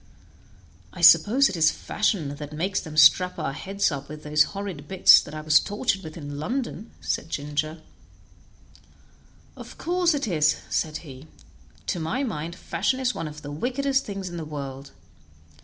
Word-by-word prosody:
"I - - -9
suppose 265 +6 +7
it 190 - -4
is 160 -1 +4
fashion 180 -9 -1
that 150 0 -8
makes 185 +5 -1
them 155 -1 -9
strap 180 +4 +6
our 135 - -3
heads 195 +5 -1
up 140 -1 -6
with 150 0 -9
those 150 0 +3
horrid 185 -8 -6
bits 190 +1 +7
that 150 - -10
I 155 - -5
was 155 0 +5
tortured 205 -1 -2
with 160 -3 -9
in 145 -2 -7
London," 235 - -4
said 160 - -3
Ginger. 150 +2 -3 1.7
"Of - - -11
course 350 -1 +1
it 280 -4 -2
is," 155 -5 +2 0.2
said 155 -1 -1
he; 135 +1 -11 0.6
"to 175 - -2
my 220 - -2
mind, 170 - -4
fashion 215 +7 -1
is 255 -1 0
one 165 - -4
of 150 0 -10
the 145 - -7
wickedest 265 - -1
things 195 -2 -6
in 175 -1 -6
the 165 - -4
world. 140 -2 -7
165 Hz, 170 wpm, -25 LUFS, 150-205 Hz, 1.7 s, suppose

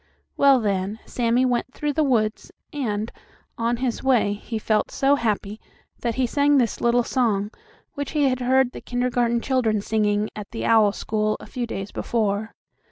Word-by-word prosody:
Well, 275 -2 +5
then, 200 -1 -1
Sammie 240 +1 +1
went 250 +1 -1
through 295 -1 -1
the 310 - +2
woods, 225 -6 0 0.2
and, 220 -6 -2 0.4
on 235 +1 0
his 250 -1 -2
way, 245 -6 +2
he 220 +2 -5
felt 215 0 0
so 275 +1 +2
happy 215 -4 -1 0.4
that 235 -2 -2
he 260 - +1
sang 285 +3 +3
this 240 -4 0
little 240 0 +3
song, 215 -5 0 0.4
which 285 0 -5
he 300 -2 +2
had 255 -1 0
heard 255 0 +2
the - - -9
kindergarten 245 -1 0
children 235 -5 +1
singing 210 0 0
at 210 -2 -7
the 225 - -5
owl 220 -3 +5
school 215 +1 -1
a - - -10
few 245 -2 -4
days 195 -2 -5
before. 215 -1 -1
235 Hz, 170 wpm, -23 LUFS, 215-255 Hz, 0.4 s, Well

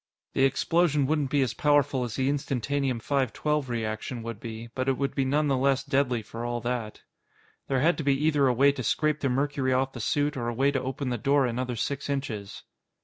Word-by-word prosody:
The 135 - +3
explosion 150 0 +2
wouldn't 145 -1 0
be 140 0 +2
as 125 - -2
powerful 145 -3 +2
as 120 -2 -4
the 130 0 0
Instantanium 140 -2 -1
512 140 +1 0
reaction 115 +1 -3
would 115 -2 -6
be, 115 0 -7
but 130 +1 -1
it 130 - +1
would 140 0 -1
be 135 - 0
none 145 +3 +1
the 140 - +2
less 135 0 +2
deadly 135 -4 0
for 115 +2 -7
all 120 0 -2
that. 120 -3 -4 0.6
There 135 -2 +1
had 165 +4 +3
to - - -2
be 140 -1 +2
either 145 -3 +3
a 125 - +3
way 140 +3 +5
to 140 - -5
scrape 155 -1 +1
the 135 - 0
mercury 135 0 0
off 135 +1 0
the 120 - -7
suit 145 +6 0
or 120 -3 -3
a 120 - -2
way 135 +3 +3
to 135 -2 -1
open 130 +1 -3
the 120 -2 -2
door 140 +3 +3
another 125 +1 -2
six 140 +5 -3
inches. 120 -8 -4
135 Hz, 220 wpm, -27 LUFS, 120-140 Hz, 0.6 s, way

